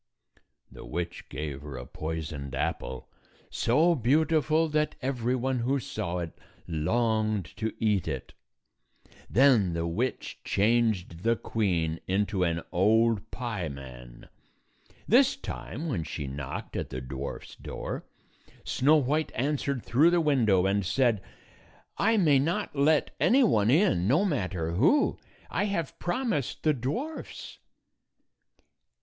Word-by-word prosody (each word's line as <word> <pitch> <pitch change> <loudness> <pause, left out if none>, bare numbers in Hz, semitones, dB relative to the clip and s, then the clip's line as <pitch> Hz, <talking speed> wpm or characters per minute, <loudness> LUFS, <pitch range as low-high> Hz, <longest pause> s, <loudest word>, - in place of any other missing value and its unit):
The - - -11
witch 85 0 -5
gave 75 -3 -5
her 70 -3 -7
a 60 - -7
poisoned 75 -3 -5
apple, 65 -1 -3 0.4
so 155 +9 +3
beautiful 155 +4 +2
that 150 0 0
every 125 -2 -1
one 130 0 -1
who 135 +4 +1
saw 90 -7 -4
it 85 -2 -5 0.3
longed 110 +4 0
to 110 -1 -1
eat 105 -6 +1
it. 70 -4 -4 1.0
Then 115 -8 +4
the 85 0 -1
witch 110 +10 -3
changed 105 -5 +1
the 115 +3 +2
queen 85 -9 -1
into 100 0 0
an 85 -1 0
old 110 +4 +3
pieman. 70 - -6 0.8
This - - +5
time, 155 +8 -6
when 115 - -1
she 75 -1 -5
knocked 70 0 -6
at - - -3
the 65 - -5
dwarfs' 65 +2 -6
door, - - -6 0.6
Snow 145 +4 +3
White 150 +2 +1
answered 140 -1 -1
through 145 +8 +4
the 175 0 +3
window, 115 - +3
and 100 +1 +1
said, 115 +1 +2 0.4
" - - -27 0.3
I 225 +2 +3
may 150 -8 +5
not 170 +6 -1
let 145 +2 +2
any 265 +3 +5
one 110 - +3
in, 145 - +3
no 150 - +3
matter 95 - -1
who. 145 - +3 0.3
I 205 - 0
have 170 -8 -3
promised 210 - -2
the 155 - +4
dwarfs." 150 - -5
115 Hz, 130 wpm, -28 LUFS, -, 1.0 s, This